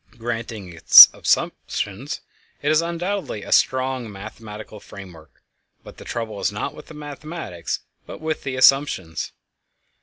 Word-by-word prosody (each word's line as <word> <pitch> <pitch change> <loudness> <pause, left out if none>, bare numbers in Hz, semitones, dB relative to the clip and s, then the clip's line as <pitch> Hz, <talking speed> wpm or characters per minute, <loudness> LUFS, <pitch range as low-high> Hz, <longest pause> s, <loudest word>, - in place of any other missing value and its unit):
Granting 115 -5 -6
its 80 - +10
assumptions, 105 +9 -2 0.4
it 145 - -2
has 155 +1 +3
undoubtedly 170 - -4
a - - -9
strong 130 -3 +1
mathematical 105 +1 -10
framework, 85 -9 -14 0.4
but - - -14
the - - -12
trouble 110 -3 -5
is - - 0
not 105 - -4
with 150 - -13
the 160 - -12
mathematics 150 - -6 0.3
but - - -9
with 155 -1 -3
the 135 -2 -5
assumptions. 130 - +2
120 Hz, 130 wpm, -22 LUFS, 100-145 Hz, 0.4 s, its